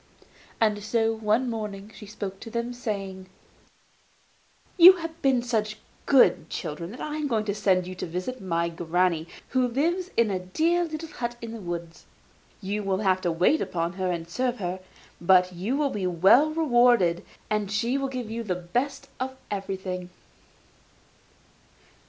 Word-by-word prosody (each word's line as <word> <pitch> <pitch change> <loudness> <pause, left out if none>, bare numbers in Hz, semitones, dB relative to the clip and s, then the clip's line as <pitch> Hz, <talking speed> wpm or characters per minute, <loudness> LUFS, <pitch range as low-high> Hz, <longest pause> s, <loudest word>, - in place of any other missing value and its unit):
And 210 -2 +2
so 225 +1 +1
one 220 +3 +1
morning 210 -3 -5
she 210 - -11
spoke 195 -2 -6
to 225 - -9
them, 235 +1 -3
saying: 195 -5 -5 1.5
'You 360 +2 +10
have 330 -2 -7
been 260 -3 +3
such 215 -3 -1 0.3
good 180 - +5
children 170 +3 -5
that 240 - -10
I 300 0 -4
am 305 -1 -1
going 220 -5 0
to 200 - -1
send 190 -3 +2
you 185 - -6
to 180 - -5
visit 185 +10 -4
my 170 -2 0
granny, 170 0 0 0.2
who 255 -2 +2
lives 340 +9 0
in 230 -3 +3
a 185 - -1
dear 325 - +1
little 320 0 -6
hut 240 -5 -4
in 230 -1 -7
the 225 -1 -7
wood. 170 -2 -4 0.7
You 205 +2 -2
will 195 0 -1
have 185 -2 +2
to 175 - 0
wait 180 - +3
upon 170 0 -2
her 185 -1 -2
and 165 -1 -4
serve 250 +7 -1
her, 185 -1 -3 0.4
but 180 +1 +4
you 200 +10 -2
will 290 -2 +1
be 195 -3 -2
well 195 - +5
rewarded, 240 - +3 0.3
for 210 -1 +1
she 230 +6 0
will 270 0 -2
give 250 -4 -5
you 230 +1 -3
the 195 -5 -2
best 240 +11 -3
of 260 +1 -4
everything. 190 -2 -4
210 Hz, 165 wpm, -26 LUFS, 185-250 Hz, 1.5 s, You